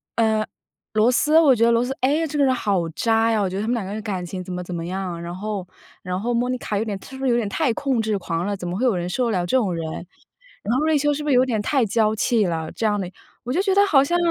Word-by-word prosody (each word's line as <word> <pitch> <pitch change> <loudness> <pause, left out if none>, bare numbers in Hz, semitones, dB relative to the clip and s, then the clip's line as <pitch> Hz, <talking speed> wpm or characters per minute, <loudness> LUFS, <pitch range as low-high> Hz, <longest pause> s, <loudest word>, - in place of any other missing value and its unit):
呃， 220 -1 +2 0.5
罗 220 +3 +4
斯， 305 +5 +4
我 290 -6 +5
觉 230 - +1
得 235 - +4
罗 235 +1 +2
斯， 265 +2 -3
哎， 295 +5 +2
这 295 0 -3
个 280 - +5
人 260 - +3
好 195 -8 0
渣 225 +6 +1
呀， 220 - +2
我 195 - +1
觉 190 - -4
得 - - -1
他 215 - -3
们 245 - +1
两 225 -5 -3
个 195 - -5
人 215 - -4
感 195 -5 -4
情 185 +1 -6
怎 185 - -8
么 180 0 -4
怎 180 - -7
么 165 - -4
样， 180 -1 -4
然 170 0 -6
后 200 -1 -4 0.4
然 180 0 -3
后 240 +4 -1
Monica 245 -3 -1
有 - - 0
点 205 -3 -3
她 - - -13
是 265 - -9
不 270 - -3
是 - - +3
有 - - +3
点 225 - -1
太 285 +1 +1
控 265 -2 0
制 215 -2 0
狂 170 -1 -3
了， 205 -1 -2
怎 175 - -6
么 175 +1 -3
会 255 - +1
有 240 -6 +3
人 175 0 -2
受 250 +7 0
得 230 - 0
了 180 -2 0
这 175 - 0
种 205 -8 0
人？ 165 -1 -4 0.8
然 235 +4 0
后 295 - +1
瑞 315 -1 +3
秋 295 +1 +2
是 295 +1 -4
不 300 - -2
是 - - +4
有 250 +1 +5
点 230 -5 -1
太 260 +3 +1
娇 215 +1 +2
气 220 -1 +2
了？ 160 -2 -3
这 225 - -3
样 210 -1 +1
的， 180 -2 -4 0.3
我 250 - -3
就 355 - +2
觉 390 -1 +1
得 400 - +6
好 275 -9 +5
像， 345 +5 +1
220 Hz, 360 characters per minute, -22 LUFS, 190-255 Hz, 0.8 s, 得